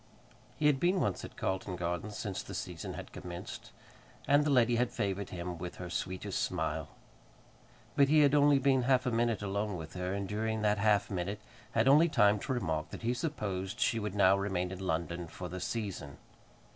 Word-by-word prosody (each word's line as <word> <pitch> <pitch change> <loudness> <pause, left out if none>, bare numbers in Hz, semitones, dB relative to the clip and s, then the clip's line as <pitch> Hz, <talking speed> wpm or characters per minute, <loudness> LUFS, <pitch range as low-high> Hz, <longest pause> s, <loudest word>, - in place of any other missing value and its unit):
He 150 - -1
had 145 -3 +4
been 180 +5 +2
once 100 - -1
at - - -9
Carlton 95 0 -2
Gardens 90 +4 -3
since 100 -4 -3
the - - -8
season - - -5
had - - -8
commenced, 90 0 -8 0.6
and 145 +1 +5
the 150 - 0
lady 120 -3 +4
had 125 0 +2
favoured 100 0 -2
him 90 -1 -5
with 90 +1 -5
her 90 -1 -7
sweetest 95 +2 -3
smile. 80 -3 -1 1.1
But 140 -2 +5
he 155 0 +6
had 145 -1 +5
only 145 -1 +6
been 135 -1 +3
half 130 0 +3
a 125 - +1
minute 115 -2 +1
alone 100 0 -2
with 80 -1 -8
her, 90 0 -3
and 100 -1 -3
during 110 +1 -2
that 105 -1 +2
half 105 0 +3
minute 95 +2 -2 0.3
had 115 +2 +3
only 150 +5 +6
time 105 -6 +4
to 130 - -4
remark 80 -10 -2
that - - -8
he 120 +2 +1
supposed 105 - -3
she 115 - +2
would 105 -2 -4
now 95 -1 +6
remain 95 -2 -1
in 95 - -6
London 85 -1 -2
for 90 +2 -7
the 90 +2 -6
season. 95 -10 -4
100 Hz, 195 wpm, -32 LUFS, 90-120 Hz, 1.1 s, he